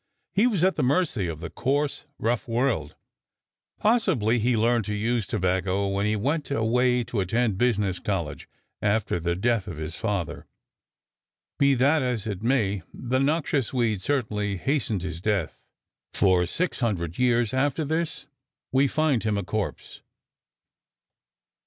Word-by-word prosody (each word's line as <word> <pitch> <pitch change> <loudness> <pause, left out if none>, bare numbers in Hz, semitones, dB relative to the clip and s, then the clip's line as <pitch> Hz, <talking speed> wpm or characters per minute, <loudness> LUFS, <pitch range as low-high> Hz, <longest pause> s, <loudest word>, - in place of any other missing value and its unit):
He 210 +5 +4
was 200 -9 0
at 190 +1 +3
the - - +1
mercy 130 - +1
of 80 -1 -5
the 85 - -6
coarse, 145 +3 -1
rough 120 +4 -1
world. 115 - 0 0.8
Possibly 170 - +2
he 120 +1 +2
learned 115 +1 +2
to 105 - -2
use 115 0 0
tobacco 95 +2 0
when 100 +1 0
he 105 - +1
went 140 +8 -1
away 125 0 +2
to 115 -1 -3
attend 105 +1 0
business 105 -7 +1
college 85 -7 -3 0.3
after 105 -3 +1
the 85 +1 -1
death 110 +1 0
of 85 -6 -6
his 80 +2 -5
father. 100 -7 -3 1.1
Be 140 -1 +5
that 140 +5 +3
as 125 -5 -1
it 105 -3 -4
may, 110 -6 +1
the 125 +1 -1
noxious 140 -3 0
weed 110 -6 +1
certainly 105 -7 -1
hastened 115 - -1
his 85 -2 -5
death, 100 -5 -1 0.5
for 90 -2 +3
600 100 - -2
years 120 -2 +2
after 145 +4 +1
this 160 -1 -2 0.5
we 135 +2 +4
find 150 -4 +1
him 110 -2 0
a 100 - -1
corpse! 105 +1 -4
115 Hz, 145 wpm, -26 LUFS, 100-135 Hz, 1.1 s, Be